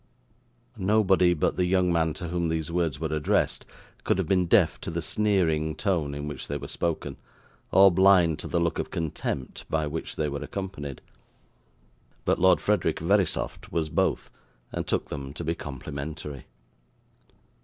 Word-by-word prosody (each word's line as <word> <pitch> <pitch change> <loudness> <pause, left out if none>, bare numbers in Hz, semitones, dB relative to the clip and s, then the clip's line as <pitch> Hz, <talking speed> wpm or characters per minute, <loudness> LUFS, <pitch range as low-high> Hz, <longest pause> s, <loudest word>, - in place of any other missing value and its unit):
Nobody 95 -3 +4
but 75 - 0
the 90 - +2
young 90 -1 +2
man 80 -2 +1
to 85 - -5
whom 85 -1 -1
these 80 0 -2
words 85 -5 0
were 80 -1 -2
addressed 75 - 0 0.4
could - - +1
have - - 0
been 90 -2 +2
deaf - - +3
to - - -5
the 85 +1 -2
sneering 85 -5 +1
tone 80 -8 -1
in 75 +1 -4
which 75 -3 -6
they 75 - -2
were - - -7
spoken, 85 -2 -3 0.5
or 95 0 +7
blind 90 -3 +5
to - - -6
the 85 - 0
look 85 0 0
of - - -3
contempt 75 -5 -4
by 80 -1 0
which 75 +2 -5
they 75 - 0
were 70 -1 -4
accompanied. 95 -9 -6 1.2
But - - +2
Lord 95 0 +5
Frederick 105 -6 +1
Verisopht 95 +1 0
was 80 -2 -1
both, - - 0 0.4
and - - -4
took - - -1
them 70 -1 -6
to 85 - -6
be 80 +1 0
complimentary. 70 0 -7
80 Hz, 165 wpm, -27 LUFS, 75-90 Hz, 1.2 s, or